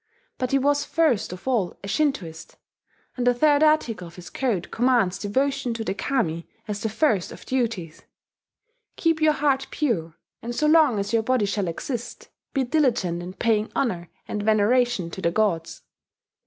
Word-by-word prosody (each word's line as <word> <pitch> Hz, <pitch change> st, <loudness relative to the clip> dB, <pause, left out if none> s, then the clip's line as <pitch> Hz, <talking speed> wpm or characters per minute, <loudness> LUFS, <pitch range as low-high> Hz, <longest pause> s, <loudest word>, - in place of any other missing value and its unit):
But 255 Hz, -, -1 dB
he 275 Hz, -, +3 dB
was 285 Hz, +2 st, +2 dB
first 295 Hz, -, +1 dB
of 180 Hz, +6 st, -9 dB
all 225 Hz, -9 st, 0 dB
a -, -, -6 dB
Shintoist; 200 Hz, -, -2 dB, 0.6 s
and 245 Hz, -1 st, -1 dB
the 245 Hz, -, +4 dB
third 290 Hz, +3 st, +4 dB
article 250 Hz, -, +2 dB
of 170 Hz, -, -14 dB
his 180 Hz, -1 st, -11 dB
code 225 Hz, -10 st, -1 dB
commands 235 Hz, -7 st, +2 dB
devotion 265 Hz, +3 st, 0 dB
to 225 Hz, -, -3 dB
the 220 Hz, -, -2 dB
Kami 195 Hz, -, -1 dB, 0.2 s
as 205 Hz, -1 st, -4 dB
the 220 Hz, -, -1 dB
first 220 Hz, -, +1 dB
of -, -, -11 dB
duties: 225 Hz, -11 st, -2 dB, 0.9 s
"Keep 330 Hz, -2 st, +1 dB
your 310 Hz, -1 st, +5 dB
heart 275 Hz, -3 st, +1 dB
pure; 175 Hz, -, -1 dB, 0.3 s
and 240 Hz, +1 st, -5 dB
so 305 Hz, -, +1 dB
long 305 Hz, -6 st, +5 dB
as 200 Hz, +2 st, -2 dB
your 225 Hz, -, +4 dB
body 250 Hz, -1 st, +1 dB
shall 200 Hz, -1 st, -1 dB
exist, 235 Hz, -, -5 dB, 0.2 s
be 270 Hz, -, 0 dB
diligent 240 Hz, -, +1 dB
in 180 Hz, +1 st, -7 dB
paying 215 Hz, 0 st, 0 dB
honour 175 Hz, -9 st, -1 dB, 0.2 s
and 210 Hz, -, -3 dB
veneration 215 Hz, -2 st, +2 dB
to 190 Hz, -, -7 dB
the 170 Hz, -, +2 dB
Gods." 170 Hz, -4 st, -1 dB
230 Hz, 170 wpm, -24 LUFS, 190-270 Hz, 0.9 s, your